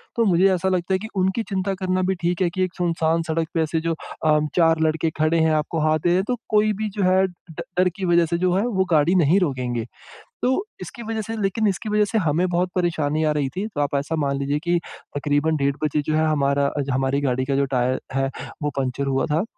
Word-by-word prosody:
तो 230 -1 +2
मुझे 190 +1 +4
ऐसा 185 +1 0
लगता 185 0 0
है - - +3
कि 220 - -6
उनकी 190 +4 +1
चिंता 195 0 -1
करना 185 0 0
भी 190 - +1
ठीक 175 +1 0
है 175 - +3
कि 185 +2 -1
एक 185 - -2
सुनसान 165 -1 +1
सड़क 165 0 0
पे 165 - +1
ऐसे 160 +1 0
जो 165 0 -1 0.3
अ, 150 -1 +4 0.2
4 165 -2 +4
लड़के 160 +1 +1
खड़े 155 +2 +2
हैं, 160 0 +3
आपको 155 +1 -1
हाथ 155 0 +2
दे 175 - 0
रहे 175 - +3
है, 190 - +1
तो 250 -1 0
कोई 215 0 +3
भी 215 +1 -3
जो 200 - +1
है 185 +1 +4
ड 170 -3 -11 0.2
डर 185 - +5
की 190 - -3
वजह 170 -1 +4
से 170 +1 -1
जो 180 0 +1
है 205 +5 +1
वो 190 -5 +1
गाड़ी 160 +4 +4
नहीं 175 +3 +4
रोकेंगे। 125 -8 -1 0.6
तो, 260 +11 +1 0.2
इसकी 235 - -8
वजह 220 0 -3
से 225 +2 -5
लेकिन 205 +3 +1
इसकी 200 +2 -2
वजह 210 0 +3
से 225 - +1
हमें 170 0 +1
बहुत 180 +1 0
परेशानी 160 -4 0
आ 155 - +2
रही 145 -3 0
थी, 200 +4 -2
तो 150 -9 -3
आप 145 0 -1
ऐसा 145 +4 -1
मान 140 -3 0
लीजिए 140 +2 -1
कि 175 0 +2 0.4
तकरीबन 145 +2 +1
डेढ़ 140 0 0
बजे 150 0 +1
जो 155 - +1
है 160 0 +2
हमारा 140 -2 +2
अज 140 -1 -2
हमारी 135 +2 0
गाड़ी 130 -1 0
का 135 0 -1
जो 140 0 +2
टायर 125 +1 +1
है 135 0 0 0.3
वो 150 - +1
पंक्चर 135 +1 -1
हुआ 135 0 +1
था। 160 +5 +2
165 Hz, 250 wpm, -22 LUFS, 145-185 Hz, 0.6 s, डर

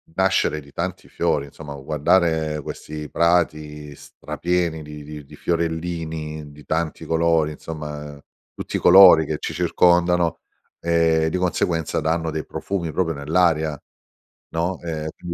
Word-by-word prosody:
nascere 95 -5 +2
di 70 - -17
tanti - - -5
fiori, 70 -1 0
insomma 75 0 -9
guardare 75 +2 +1
questi 75 +1 -7
prati 75 -3 0
strapieni 85 +1 -3
di 75 0 -9
di 75 0 -9
di - - -14
fiorellini, 80 -3 -3
di 75 0 -14
tanti 80 0 -2
colori, 80 -1 +2
insomma 75 -1 -7 0.4
tutti - - -4
i - - -4
colori 90 -3 +8
che 75 - -2
ci - - -4
circondano, 90 -1 +2 0.4
ehm, 80 -1 +2
di 80 - -2
conseguenza 85 -3 0
danno 80 +1 -1
dei 80 -1 -4
profumi 95 -4 -3
proprio 80 -3 0
nell'aria, 80 0 +1 0.7
no, 85 +3 -1
ehm, 80 -2 -4
è - - -3
più 85 - -7
80 Hz, 135 wpm, -22 LUFS, 75-85 Hz, 0.7 s, colori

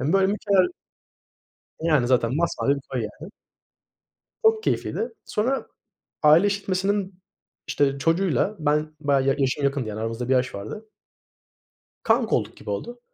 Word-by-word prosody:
yani, 145 +7 0
böyle, 195 -1 +4
mükemmel 200 -2 +2 1.1
Yani, 150 -7 +2
zaten 125 0 +2
masmavi 155 -4 +1
bir 140 - -7
koy, 130 -3 -2 0.2
yani. 185 +5 -9 1.1
Çok 445 0 +4
keyifliydi. 455 - -1
Sonra 250 +6 -1 0.6
aile 155 +6 +6
işletmesinin, 195 -1 -1 0.5
işte, 140 -1 +1
çocuğuyla, 170 - +1
ben, 150 0 0
bayağı 140 -2 +2
ya 135 - +4
yaşım 140 +1 0
yakındı, 140 -4 0
yani, 105 0 -5
aramızda 115 +2 -3
1 - - +2
yaş 125 0 +1
vardı. 210 - -7 1.1
Kanka 225 0 +2
olduk 110 -2 -3
gibi - - -9
oldu. 240 - -4
155 Hz, 135 wpm, -24 LUFS, 130-200 Hz, 1.1 s, aile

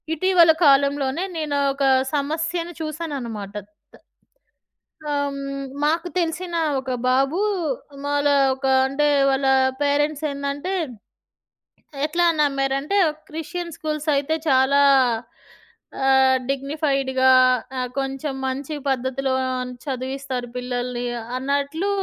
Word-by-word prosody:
ఇటీవల 345 0 +5
కాలంలోనే 280 +2 +3
నేను 300 -2 -1 0.2
ఒక 275 0 -3 0.3
సమస్యను 325 +4 -1
చూసానన్నమాట. 275 -11 -5 1.5
త - - -14
ఆహ్, 285 0 0
హ్మ్. 275 0 -5 0.2
మాకు 325 +4 +1
తెలిసిన 345 +1 -2 0.2
ఒక 260 0 -5 0.2
బాబు, 270 +6 +2 0.7
మాళా 290 0 +2 0.2
ఒక 265 +1 -6 0.2
అంటే, 285 +2 +1 0.2
వాళ్ళ 270 0 0 0.4
పేరెంట్స్ 290 +1 +1
ఏందంటే, 280 +6 -3 1.3
ఎట్లా 345 +3 +1
నమ్మారంటే, 275 +4 +1 0.3
క్రిస్టియన్ 335 +2 -5
స్కూల్స్ 305 0 -4
అయితే 290 +3 0
చాలా 265 +1 +4 1.3
ఆహ్, 265 -1 +5
డిగ్నిఫైడ్‌గా, 275 -2 0 0.5
ఆహ్, 250 -1 -2
కొంచెం 270 +1 -3
మంచి 270 +3 -4
పద్ధతిలో 265 +1 -1 0.5
చదివిస్తారు 260 -2 -4
పిల్లల్ని, 245 0 -3 0.3
అన్నట్లు 280 +7 -1
280 Hz, 95 wpm, -22 LUFS, 265-310 Hz, 1.5 s, ఇటీవల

